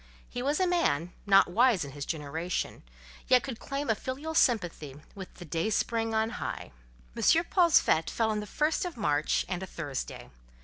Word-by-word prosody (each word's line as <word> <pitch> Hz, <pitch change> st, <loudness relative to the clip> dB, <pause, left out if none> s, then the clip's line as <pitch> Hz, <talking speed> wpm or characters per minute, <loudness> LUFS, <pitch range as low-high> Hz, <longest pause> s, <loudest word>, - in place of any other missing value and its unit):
He 245 Hz, -, -5 dB
was 285 Hz, +4 st, 0 dB
a 370 Hz, -, +3 dB
man, 180 Hz, -, 0 dB
not 195 Hz, -3 st, +5 dB
wise 230 Hz, -, +3 dB
in 140 Hz, -, -8 dB
his 140 Hz, 0 st, -7 dB
generation, 160 Hz, +3 st, -3 dB, 0.5 s
yet 250 Hz, -1 st, +5 dB
could 260 Hz, -4 st, -5 dB
he -, -, -16 dB
claim 275 Hz, +1 st, -3 dB
a 225 Hz, -, +3 dB
filial 270 Hz, +8 st, -5 dB
sympathy 175 Hz, -, +1 dB
with 190 Hz, -2 st, -9 dB
"the 175 Hz, -, -10 dB
dayspring 220 Hz, +7 st, -1 dB
on 220 Hz, +1 st, +1 dB
high." -, -, -5 dB, 0.4 s
M. -, -, -5 dB, 0.3 s
Paul's 345 Hz, -4 st, +5 dB
fête 160 Hz, 0 st, +1 dB
fell 225 Hz, -1 st, 0 dB
on 210 Hz, -, -1 dB
the 210 Hz, -, -6 dB
first 305 Hz, +8 st, 0 dB
of 355 Hz, -7 st, -5 dB
March 150 Hz, -7 st, +1 dB
and 180 Hz, -1 st, -3 dB
a 190 Hz, -, -5 dB
Thursday. 145 Hz, -, -6 dB
210 Hz, 185 wpm, -29 LUFS, 165-260 Hz, 0.5 s, not